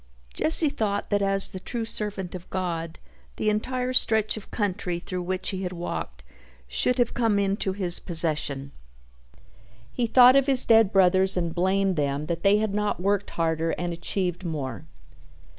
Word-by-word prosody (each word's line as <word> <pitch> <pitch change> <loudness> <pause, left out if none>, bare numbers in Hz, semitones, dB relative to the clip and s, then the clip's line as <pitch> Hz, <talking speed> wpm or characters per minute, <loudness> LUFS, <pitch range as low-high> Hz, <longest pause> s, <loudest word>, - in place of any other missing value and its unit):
Jesse 315 -1 +4
thought 205 -6 -3
that 205 0 +1
as 195 0 +2
the 185 - -8
true 230 +4 -5
servant 205 -5 -3
of 180 -1 -9
God 170 -3 -4 0.4
the 215 - 0
entire 250 +4 -2
stretch 220 -3 +2
of 215 - -10
country 185 -4 -2
through 180 +1 -5
which 185 +1 -3
he 190 -1 -5
had 180 -2 -4
walked 65 - -6 0.4
should 250 - 0
have 245 -2 +1
come 225 -4 +1
into 195 -1 -1
his 185 -3 +4
possession. 155 -5 -1 1.2
He 240 - -1
thought 250 +2 +7
of 275 0 +3
his 265 -2 +4
dead 225 -3 +4
brothers 190 0 +3
and 170 -2 -2
blamed 190 +1 0
them 145 0 -1
that 170 +1 -4
they 200 +1 +4
had 215 -1 -2
not 210 -2 -1
worked 200 +2 -1
harder 165 0 0
and 175 0 -3
achieved 175 +1 -2
more. 145 -8 -5
190 Hz, 165 wpm, -25 LUFS, 170-210 Hz, 1.2 s, thought